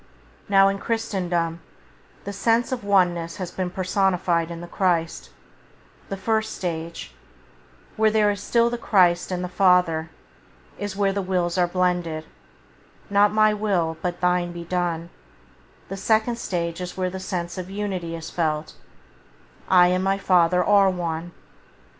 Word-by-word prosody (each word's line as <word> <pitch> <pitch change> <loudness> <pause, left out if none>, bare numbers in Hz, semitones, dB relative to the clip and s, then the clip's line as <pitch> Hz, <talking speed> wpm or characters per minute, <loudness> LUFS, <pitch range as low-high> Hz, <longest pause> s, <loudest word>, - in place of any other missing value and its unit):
Now 195 -1 +6
in 195 0 -1
Christendom 175 -7 -2 0.6
the 200 - -5
sense 230 +5 +1
of 255 -4 -3
one 190 -3 +3
ness 170 -1 -6
has 185 -3 -5
been 185 0 -3
personified 185 -2 0
in 170 -1 -6
the 175 - -8
Christ, 170 -3 -1 0.8
the 195 - -4
first 220 +2 -1
stage 165 - -5 0.4
— 60 0 -29
where 220 0 +4
there 210 -1 +3
is 200 -1 -5
still 235 +2 +2
the 240 - -3
Christ 180 -6 +3
and 180 0 -2
the - - -2
Father 180 -4 +2 0.3
— - - -29
is 205 -1 -4
where 200 -1 +1
the 200 - -1
wills 180 -2 -1
are 180 -1 +2
blended, 175 -3 -1 0.9
"not 205 +1 +4
my 215 0 +4
will 190 -6 0
but 175 0 -3
thine 180 -1 +1
be 170 0 -7
done"; 170 -1 -2 0.8
the 195 - -6
second 220 +3 +1
stage 170 -4 -3
is 180 0 -6
where 185 -1 -1
the 190 - -6
sense 180 -1 -4
of 180 0 -6
unity 190 -4 -4
is 165 0 -7
felt: 155 -2 -2 1.0
"I 180 -1 +6
and 185 +1 +1
my 195 0 +1
Father 180 -2 +3
are 200 -2 +5
one". 175 -2 -3
180 Hz, 160 wpm, -23 LUFS, 170-200 Hz, 1.0 s, Now